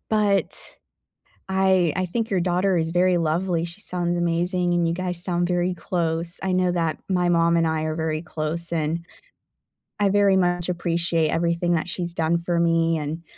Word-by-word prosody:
but 205 -2 +1 0.9
I 190 -4 +3
I 185 - 0
think 225 +5 -2
your 195 - +1
daughter 180 +1 +1
is 160 0 -1
very 180 +1 +3
lovely, 170 +1 0
she 170 +5 -9
sounds 175 -2 -2
amazing, 175 +1 0
and 175 -1 +2
you 165 - 0
guys 180 -1 -4
sound 175 -1 0
very 180 0 0
close. 170 -1 -3
I 190 - 0
know 185 -1 +2
that 165 -3 -1
my 180 -2 +1
mom 170 0 +3
and 165 -1 +2
I 160 -1 -1
are 155 0 -2
very 160 -1 -2
close, 165 +1 -4
and 165 +1 -1 0.9
I 205 -1 +3
very 200 -1 +4
much 175 -2 +1
appreciate 170 -2 0
everything 170 +1 0
that 160 - -2
she's 175 -1 -4
done 165 0 +1
for 170 0 -1
me 165 -1 +2
and, 155 +2 -4
175 Hz, 180 wpm, -23 LUFS, 165-180 Hz, 0.9 s, very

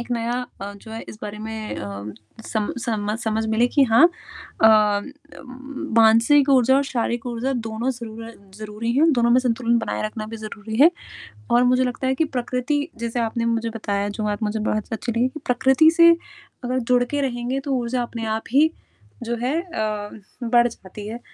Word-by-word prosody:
एक 240 - -8
नया 235 0 -1 0.3
अ, 200 +1 -5
जो 210 +2 -13
है 225 - -5
इस 215 - -10
बारे 210 0 -6
में 220 0 -5
अ, 100 +1 -6 0.4
सम 215 -2 -1
समझ 215 -2 -2
समझ 220 -1 -1
मिले 220 +2 +2
कि 285 - +7
हाँ 230 +8 +7 0.6
अ, 220 - +9 1.3
मानसिक 230 +6 +5
ऊर्जा 265 0 +5
और 280 - +3
शारीरिक 240 -2 -2
ऊर्जा 245 +2 -2 0.2
दोनों 225 +4 -2
ज़रूर 230 -2 -8 0.3
ज़रूरी 215 +2 -4
हैं 320 +3 +5
दोनों 235 -3 +2
में 245 - +6
संतुलन 235 -1 +1
बनाए - - -3
रखना 215 0 -6
भी 225 +1 -7
ज़रूरी 220 0 -7
है 320 +4 +8 0.6
और 240 - +5
मुझे 255 +1 +3
लगता 250 +1 -3
है 265 - +2
कि 320 +4 +1
प्रकृति 250 +4 -1 0.2
जैसे 235 +1 -2
आपने 230 0 -1
मुझे 230 0 -1
बताया 205 -2 -2
जो 215 - -2
बात 210 +1 -2
मुझे 215 +1 -1
बहुत 215 +1 -3
अच्छी 230 +2 -3
लगी 235 +3 +1
कि 310 +4 -10
प्रकृति 265 +5 +4
से 335 0 +9 0.5
अगर 250 +1 -1
जुड़ 245 0 +4
के 285 +4 -3
रहेंगे 255 0 -2
तो 275 0 -4
ऊर्जा 245 0 -1
अपने 235 -1 -5
आप 220 - -4
ही, 300 +4 +5 0.5
जो 235 +1 -2
है 275 +7 0
अ, 215 - -3 0.4
बढ़ 240 0 +4
जाती 205 -2 -11
है 230 +2 -6
235 Hz, 190 wpm, -22 LUFS, 220-255 Hz, 1.3 s, अ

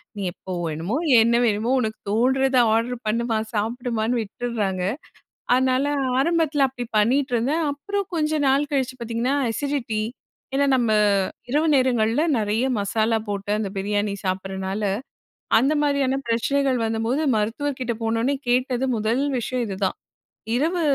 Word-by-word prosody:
நீ 205 - -5
எப்போ 185 - -10
வேணுமோ 165 - -3 0.3
என்ன 235 +1 +3
வேணுமோ 220 +2 +1
உனக்கு 220 -2 -3
தோணுறத 260 +4 +2 0.2
ஆர்டர் 235 +2 0
பண்ணுமா! 230 +1 0 0.2
சாப்பிடுமான்னு! 230 +1 -1
விட்டுர்றாங்க. 210 -3 -3 0.7
அதனால 260 +1 +2 0.3
ஆரம்பத்துல 315 -1 +2
அப்பிடி 250 -2 -6
பண்ணிட்ருந்தேன். 260 +5 +1
அப்புறம் 400 +7 -3
கொஞ்ச 305 -1 0 0.2
நாள் 280 +2 +2
கழிச்சு 260 -2 0
பார்த்தீங்கன்னா, 235 +3 -1 0.2
அசிடிட்டி. 240 -4 -2 0.5
ஏன்னா 280 +1 +3
நம்ம 235 -3 +1 0.6
இரவு 300 +5 +2
நேரங்கள்ல 250 0 +2
நெறைய 215 +3 0
மசாலா 220 +2 +1
போட்டு 205 0 -3
அந்த 210 -2 -2
பிரியாணி 205 +1 -1
சாப்பிடறனால, 190 +2 -3 0.7
அந்த 270 +7 +3
மாதிரியான 275 -2 +1
பிரச்சனைகள் 265 +3 +1
வந்தபோது 225 +6 0
மருத்துவர்க்கிட்ட 250 +3 -2
போனோவுனே 230 +5 +1
கேட்டது 250 +1 +1
முதல் 220 +4 0 0.2
விஷயம் 250 +1 -2
இது 195 - -4
தான். 185 - -2 0.6
இரவு 330 +7 +1
240 Hz, 125 wpm, -23 LUFS, 220-270 Hz, 0.7 s, என்ன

